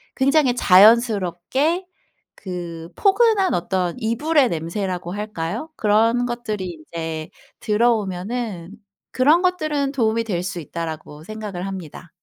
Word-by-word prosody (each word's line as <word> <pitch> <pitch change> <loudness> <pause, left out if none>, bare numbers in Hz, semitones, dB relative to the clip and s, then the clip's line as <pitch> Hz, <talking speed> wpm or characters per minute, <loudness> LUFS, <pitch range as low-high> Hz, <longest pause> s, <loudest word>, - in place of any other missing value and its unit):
굉장히 275 -1 +3
자연스럽게 225 - +4 0.5
그 170 -3 -7
포근한 405 -1 +3
어떤 180 0 -1
이불의 265 +5 +2
냄새라고 175 +2 -3
할까요? 210 - -4
그런 225 +3 +3
것들이 215 -8 -4
이제 160 -2 -5 0.3
들어오면은 210 -3 -1 0.4
'그런 295 +7 +4
것들은 310 -6 0
도움이 230 -3 +1
될 180 -6 -2
수 180 -1 -4
있다.'라고 155 -1 -7
생각을 205 -3 -6
합니다. 185 -3 -8
210 Hz, 275 characters per minute, -21 LUFS, 175-250 Hz, 0.5 s, 자연스럽게